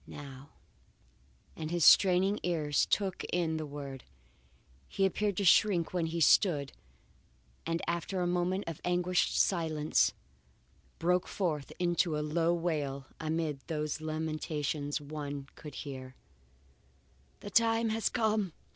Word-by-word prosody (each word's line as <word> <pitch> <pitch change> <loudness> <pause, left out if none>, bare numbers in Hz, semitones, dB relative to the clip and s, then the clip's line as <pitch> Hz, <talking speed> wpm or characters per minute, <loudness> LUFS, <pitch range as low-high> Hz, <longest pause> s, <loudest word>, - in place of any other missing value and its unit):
now, 140 -1 -10 1.1
and 155 -1 -5
as - - -4
his 170 -4 +2
straining 190 +2 +6
ears 155 -5 +1
took 195 -3 0
in 165 -2 -1
the 155 -1 -4
word, 140 -3 -7 0.8
he 195 - 0
appeared 200 0 0
to 200 - 0
shrink 180 -2 +4
where 175 -2 0
he 165 +1 -3
stood 150 -4 +4 1.0
and 165 0 -1
after 170 +2 -2
a 180 - 0
moment 180 +2 0
of 165 -3 -6
anguished 180 0 +1
silence, 160 -4 +2 0.9
broke 180 +2 +1
forth 155 -7 -2
into 175 -2 +1
a - - -1
low 165 +2 +1
wail, 150 -6 -2
amid 155 -2 -2
whose 155 -1 -2
lamentations 155 -2 -2
one 145 -1 -6
could 150 -2 -10
hear: 130 -2 -7 1.3
"The 205 - -8
time 230 +1 +3
has 220 0 0
come! 215 -6 0
165 Hz, 130 wpm, -31 LUFS, 150-180 Hz, 1.3 s, straining